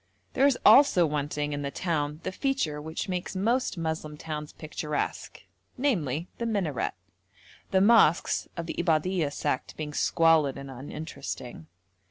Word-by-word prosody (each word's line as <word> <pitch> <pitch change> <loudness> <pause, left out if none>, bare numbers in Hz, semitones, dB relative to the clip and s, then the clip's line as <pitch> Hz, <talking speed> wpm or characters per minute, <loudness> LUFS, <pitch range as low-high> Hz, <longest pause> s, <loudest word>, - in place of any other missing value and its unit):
There 275 +2 +4
is 270 -3 +2
also 270 -11 +7
wanting 150 0 -2
in 145 - -3
the 140 - -2
town 150 -1 -2
the - - -2
feature 185 - -1
which 160 +5 -4
makes 180 0 -3
most 230 +3 0
Moslem 160 -2 -3
towns 150 -1 -6
picturesque, 150 -1 -4 0.3
namely 175 - 0
the 235 - -1
minaret; 190 - -1 0.7
the 190 - +3
mosques 205 -6 +4
of 170 - -3
the - - -4
Ibadhuyah 165 -1 +1
sect 130 - -3
being 150 -1 -5
squalid 160 -4 +3
and 140 0 -8
uninteresting. 135 - -7
160 Hz, 140 wpm, -28 LUFS, 150-185 Hz, 0.7 s, also